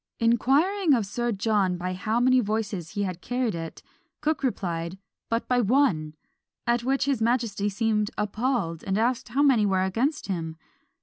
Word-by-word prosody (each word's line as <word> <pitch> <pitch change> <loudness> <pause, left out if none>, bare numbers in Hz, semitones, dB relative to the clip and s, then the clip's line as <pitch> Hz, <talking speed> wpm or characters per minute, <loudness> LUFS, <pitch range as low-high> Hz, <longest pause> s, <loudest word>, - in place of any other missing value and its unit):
Inquiring 285 - +3
of 225 -4 0
Sir 240 +4 -2
John 200 -3 +1
by 180 +1 -3
how 215 +5 -1
many 255 +1 +4
voices 205 -6 -2
he 205 - -1
had 180 -2 -4
carried 245 -2 -1
it? 165 -1 -7 0.4
Cooke 305 -1 0
replied, 180 -8 -2 0.3
"But 230 +1 -1
by 250 -1 +3
one!" 195 - +2 0.5
at 235 0 +1
which 270 +2 +1
his 275 -5 0
majesty 225 -3 +1
seemed 210 0 0
appalled, 210 -5 -1
and 190 0 -1
asked 235 +2 0
how 275 +5 +2
many 260 -7 +4
were 190 -1 +2
against 250 - 0
him? 165 -4 -4
225 Hz, 165 wpm, -26 LUFS, 190-250 Hz, 0.5 s, many